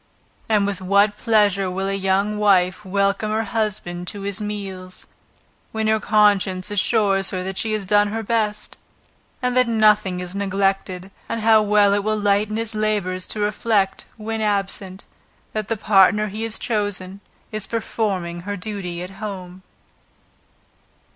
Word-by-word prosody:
And 210 -2 +3
with 200 -1 -3
what 200 +2 +3
pleasure 205 -5 +2
will 190 +1 -2
a 195 - -1
young 195 +2 0
wife 190 -1 +3
welcome 200 +2 0
her 220 +1 0
husband 195 -5 -3
to 205 - -6
his 200 +1 -3
meals, 195 -3 -6 0.7
when 220 0 -2
her 220 0 +3
conscience 205 -2 +2
assures 200 -1 +2
her 185 -2 -3
that 190 0 -4
she 220 -1 -1
has 215 -2 -2
done 205 +2 +4
her 225 +2 -3
best, 215 -1 -2 0.6
and 250 0 0
that 255 -1 +4
nothing 215 -5 +3
is 180 0 -6
neglected; 195 -1 -1 0.2
and 230 -1 -2
how 220 0 +5
will 205 -1 +4
it 205 - +2
lighten 210 0 +1
his 225 -1 -3
labors 205 -4 -1
to 215 - -4
reflect, 205 -1 0
when 220 0 -4
absent, 195 -2 -2 0.5
that 215 -1 -3
the 225 - -1
partner 210 +1 +4
he 215 +3 -6
has 225 -1 -3
chosen, 205 -4 -2 0.3
is 215 -3 -4
performing 200 -6 -2
her 200 +3 -4
duty 180 -3 -5
at 180 - -8
home. 185 -3 -6
205 Hz, 150 wpm, -21 LUFS, 190-215 Hz, 0.7 s, how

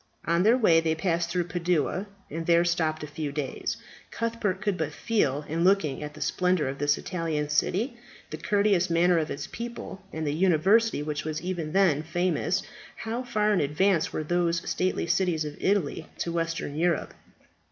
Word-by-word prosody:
On 170 +1 +2
their 225 +6 +5
way 170 -9 +5
they 160 -1 0
passed 170 0 0
through 180 0 0
Padua, 175 +2 -1 0.2
and 165 +2 -4
there 170 0 +5
stopped 160 -3 0
a - - -5
few 150 0 -4
days. 140 -2 -3 0.3
Cuthbert 230 -5 -2
could 205 -1 0
but 160 -4 -2
feel, 150 - 0
in 165 +2 -1
looking 180 -8 +2
at 150 0 -6
the - - -10
splendour 180 -5 +1
of 135 +1 -4
this 145 0 +2
Italian 160 -4 -2
city, 215 - 0 0.3
the - - -4
courteous 200 -4 +2
manner 170 +1 +4
of 155 - -2
its 140 0 -4
people, 235 -4 -7
and 160 0 -4
the 145 - 0
university 190 +3 +3
which 150 -1 -3
was 155 0 -3
even 175 -4 -3
then 185 -7 +4
famous, 175 +3 0 0.3
how 230 +2 -4
far 215 -4 +1
in 195 - +2
advance 160 +4 +2
were 155 - -2
those 170 +1 0
stately 185 -1 0
cities 170 -2 +1
of 150 -1 -6
Italy 170 -5 0
to 170 - -2
Western 165 -3 -2
Europe. 170 +1 0
170 Hz, 180 wpm, -27 LUFS, 155-190 Hz, 0.3 s, their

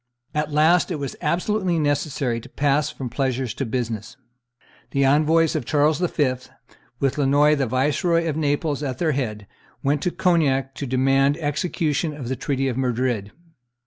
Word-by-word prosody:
At 150 0 -1
last 155 +2 +4
it 175 - -2
was 140 -2 -5
absolutely 180 +3 0
necessary 145 -5 -1
to 130 - -13
pass 145 +2 +1
from 140 -4 -6
pleasure 130 +1 -1
to 130 +3 -4
business. 115 -3 -4 0.7
The 140 +2 +1
envoys 155 +4 +3
of 155 - -1
Charles 150 +3 +2
V., 150 -7 +1 0.7
with 135 0 0
Lannoy, 145 +2 +4
the 135 -3 0
Viceroy 150 - +1
of 155 - -1
Naples, 145 -1 0
at 130 -4 -3
their 165 -3 +1
head, 110 -7 -3 0.4
went 145 +1 +1
to 180 - +1
Cognac 155 -8 +1
to 140 - -5
demand 135 +3 +2
execution 155 0 -1
of 125 -5 -6
the 130 - -1
treaty 135 +1 -1
of 125 -2 -2
Madrid. 125 -5 -1
145 Hz, 160 wpm, -23 LUFS, 130-155 Hz, 0.7 s, last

